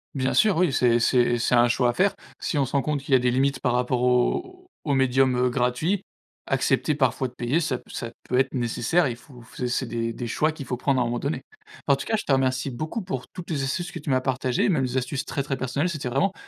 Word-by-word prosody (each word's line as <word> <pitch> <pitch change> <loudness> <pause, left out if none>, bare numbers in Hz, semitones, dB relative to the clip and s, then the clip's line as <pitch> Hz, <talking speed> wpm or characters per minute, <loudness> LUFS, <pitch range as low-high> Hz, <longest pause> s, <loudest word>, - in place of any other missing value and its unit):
Bien 130 -1 0
sûr, 210 -5 +4
oui, 170 -6 +2
c'est 120 -3 +3
c'est 120 0 +3
c'est 120 +1 +1
un 120 0 +5
choix 120 +1 +2
à - - -10
faire. 195 +7 +2 0.3
Si 150 - -1
on 140 - +3
se 130 - -9
rend 140 - +3
compte 150 0 -1
qu'il 140 0 -2
y - - +9
a - - +5
des 125 0 +1
limites 135 +1 +1
par 125 - +1
rapport 125 0 0
aux 360 - 0
aux 145 - 0
médiums, 130 -1 +3
heu, 125 0 +2
gratuits, 135 +10 0 0.4
accepter 135 +2 +1
parfois 130 -2 +1
de - - -23
payer, 125 +7 0
ça 130 -5 -1
ça 115 -1 -6
peut 125 - -1
être 135 +1 +2
nécessaire. 125 +7 +1
Et 130 - 0
il - - -5
faut 125 0 -15
f 120 +2 -9
c'est 130 +2 -1
des 115 0 -2
des 120 +1 -5
choix 155 +7 +1
qu'il 150 -3 -8
faut 125 - -2
prendre 130 +1 +1
à - - +3
un - - -1
moment 120 0 -2
donné. 140 +5 -3 0.4
En 140 - +5
tout 135 - -6
cas, 220 - 0
je - - -5
te - - 0
remercie 135 0 +1
beaucoup 155 - -4
pour 135 -10 -5
toutes 180 -2 -9
les 140 -4 -1
astuces 175 +6 -2
que 170 - -5
tu 145 - -7
m'as 130 - +3
partagées, 130 -1 0
même 160 -9 +2
les 130 0 -1
astuces 135 +2 -2
très, 140 -2 -3
très 135 -1 -2
personnelles. 130 +6 -1
C'était 150 -7 -3
vraiment 180 +10 +1
130 Hz, 270 wpm, -25 LUFS, 125-150 Hz, 0.4 s, y